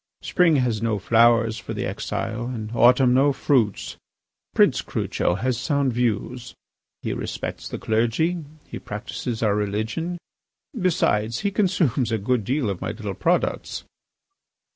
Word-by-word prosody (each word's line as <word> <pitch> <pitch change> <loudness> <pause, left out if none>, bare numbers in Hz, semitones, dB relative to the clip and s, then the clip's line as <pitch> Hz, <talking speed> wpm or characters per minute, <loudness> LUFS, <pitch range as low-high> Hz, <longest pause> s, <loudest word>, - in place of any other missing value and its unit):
Spring 170 -3 +3
has 120 -5 +1
no 115 -2 0
flowers 115 +1 +3
for - - -6
the - - -2
exile, 115 +2 -3
and 110 -4 -5
autumn 125 +2 +5
no 135 +3 +4
fruits. 125 -7 0 0.6
Prince - - +4
Crucho 90 - -1
has 120 +4 -1
sound 140 -1 0
views; 120 +1 -2 0.5
he - - -2
respects - - -5
the - - -4
clergy; 120 +10 0 0.2
he - - -7
practises 110 +2 -5
our 105 -2 +3
religion; 110 - -2 0.6
besides, 120 - +1
he 200 - 0
consumes 170 - +1
a 110 - +1
good 110 +2 0
deal 130 +2 0
of 95 -3 -3
my - - -2
little 105 -3 -5
products." 170 - -1
120 Hz, 140 wpm, -23 LUFS, 110-140 Hz, 0.6 s, autumn